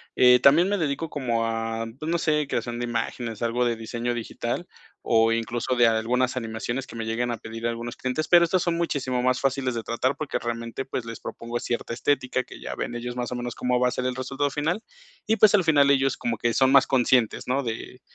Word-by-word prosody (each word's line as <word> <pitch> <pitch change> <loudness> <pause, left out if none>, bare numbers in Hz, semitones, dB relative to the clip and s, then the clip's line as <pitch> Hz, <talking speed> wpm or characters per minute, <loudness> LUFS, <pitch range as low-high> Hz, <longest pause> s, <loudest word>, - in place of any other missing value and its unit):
Eh, 125 0 +7
también 160 +9 +5
me 205 - +1
dedico 155 0 -2
como 120 -6 -1
a, 115 0 -2
pues, 155 - -4
no 170 - +2
sé, 150 -3 +1
creación 120 -2 -3
de 120 - -1
imágenes, 120 -1 -3
algo 120 +1 +1
de 120 -1 +1
diseño 115 +2 -3
digital 120 +6 -4 0.4
o 115 0 +3
incluso 115 +2 -1
de 120 -1 +5
algunas 120 +3 +1
animaciones 120 +2 -3
que - - -11
me 115 -1 -4
lleguen 120 +2 -1
a 115 - -3
pedir 115 +2 -5
algunos 120 0 -4
clientes, 130 +5 -2
pero 175 -1 +7
estas 180 +1 +1
son 170 -1 0
muchísimo 130 -7 -1
más 130 0 +2
fáciles 135 -2 0
de 115 - -3
tratar, 125 +4 -1
porque 155 - -3
realmente, 115 +2 -4
pues, 125 -2 -4
les 115 0 -7
propongo 120 +1 -5
cierta 120 -1 -3
estética, 130 0 0
que - - -12
ya - - -6
ven 120 - -4
ellos 120 +1 -5
más 125 0 -3
o - - -2
menos 120 -1 -4
cómo 125 0 0
va 125 - +3
a - - -5
ser 125 - -3
el 130 - -1
resultado 135 +2 -2
final, 160 +9 -1 0.5
y 220 - +3
pues, 215 -2 +6
al 200 -3 +5
final 145 -4 +5
ellos 135 -1 +2
como 115 -2 -2
que 120 -1 +1
son 130 0 +4
más 135 -1 +6
conscientes, 125 -3 +2
¿no?, 130 +3 +1
de 120 +2 -6
125 Hz, 230 wpm, -25 LUFS, 115-135 Hz, 0.5 s, Eh